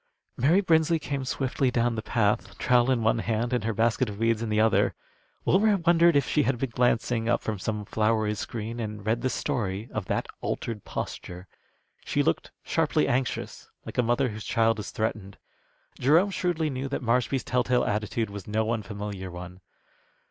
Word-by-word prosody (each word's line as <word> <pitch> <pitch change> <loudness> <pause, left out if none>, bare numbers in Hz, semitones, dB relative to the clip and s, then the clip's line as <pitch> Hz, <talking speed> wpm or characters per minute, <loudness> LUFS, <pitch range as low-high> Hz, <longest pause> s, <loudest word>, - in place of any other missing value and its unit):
Mary 160 +10 +4
Brinsley 165 -2 +3
came 140 -3 -3
swiftly 130 0 0
down 120 -1 +1
the 110 - -3
path, 105 -2 0
trowel 125 0 +3
in 125 -3 +2
one 110 +1 +2
hand 115 +2 -1
and 125 - 0
her 115 - +1
basket 115 +2 +1
of 100 - -7
weeds 115 0 +1
in 115 - -2
the 105 0 +1
other. 110 0 +3 0.5
Wilmer 205 +2 +4
wondered 170 -2 +4
if 140 -2 +3
she 150 - +2
had 135 -3 +1
been 130 0 -3
glancing 120 -1 +1
up 120 - +1
from 110 -3 -3
some 105 +1 -3
flowery 110 0 +1
screen 115 +2 -5
and 105 -2 -5
read 115 +2 +1
the 130 - 0
story 110 -6 -2
of 110 -3 -3
that - - -1 0.2
altered 115 -4 -3
posture. 90 +1 -6 0.6
She - - 0
looked - - 0
sharply 75 - +1
anxious, 130 0 -2 0.2
like - - -5
a - - +7
mother 120 +2 +1
whose 110 0 -7
child 115 -1 +2
is 105 - -5
threatened. 105 -3 -3 0.6
Jerome 165 +10 +4
shrewdly 170 -5 0
knew 130 +1 -3
that 135 - -3
Marshby's 120 +2 +1
telltale 125 0 +1
attitude 105 +1 -1
was 100 -2 -8
no 110 +1 0
unfamiliar 105 -3 -4
one. 90 +1 -9
115 Hz, 180 wpm, -27 LUFS, 105-130 Hz, 0.6 s, a